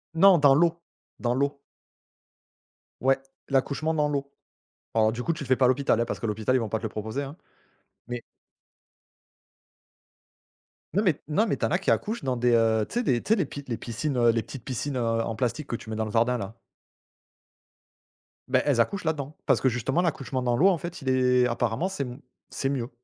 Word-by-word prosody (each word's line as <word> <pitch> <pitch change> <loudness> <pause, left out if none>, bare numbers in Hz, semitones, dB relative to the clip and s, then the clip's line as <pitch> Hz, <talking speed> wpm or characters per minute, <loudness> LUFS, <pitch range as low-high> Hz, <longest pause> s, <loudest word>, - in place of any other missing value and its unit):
Non 190 +2 +7
dans 145 -3 +6
l'eau, 170 +3 +3 0.4
dans 120 -1 0
l'eau. 140 +2 0 1.4
Ouais, 135 +1 +3 0.3
l'accouchement 140 +4 +1
dans 150 -2 +2
l'eau. 140 -1 -3 0.6
Alors, 110 -1 +3
du 120 +2 -4
coup, 170 - 0
tu 155 - -5
le - - -11
fais 130 - +4
pas 130 - +2
à - - +4
l'hôpital 130 -2 +2
hein, - - +2
parce - - -5
que - - -2
l'hôpital 110 +3 0
ils - - +4
vont 115 -3 -2
pas 110 - -1
te - - -14
le - - 0
proposer 110 +6 -4
hein, 140 +2 -7 0.7
mais 120 -1 -4 2.7
Non 205 - +4
mais 175 -8 +2
non 205 +9 +2
mais - - 0
tu - - 0
en - - -1
as 185 - +2
qui 195 - -2
accouchent 220 -2 0
dans 130 -2 -1
des, 120 +1 +2
heu 110 -2 +3
tu - - -12
sais - - 0
des 125 - +1
tu 220 - +2
sais - - +5
des 185 - 0 0.2
les 120 -3 -2
piscines, 120 +5 -3
heu, 120 -1 +4
les 115 -1 -1
petites 120 +2 -9
piscines, 135 +3 -3
heu, 115 -2 0
en 115 0 -3
plastique 130 +5 -2
que - - -2
tu 115 - -9
mets 110 - -3
dans 110 0 -1
le 110 - -5
jardin 115 +3 +2
là. 100 -1 -6 1.9
Beh, 130 0 +3
elles 140 -5 +2
accouchent 200 - -1
là-dedans. 150 -2 -2
Parce - - +3
que 130 - +4
justement 125 +7 0
l'accouchement 135 -6 -2
dans 120 -1 +1
l'eau 180 - +5
en 190 -3 +4
fait 170 0 -7
il 135 - -2
est 125 -1 +3
apparemment, 120 +8 0
c'est 190 -7 -3
m 125 0 -7 0.3
c'est 135 - -2
mieux 125 -4 -2
130 Hz, 215 wpm, -26 LUFS, 115-150 Hz, 2.7 s, Non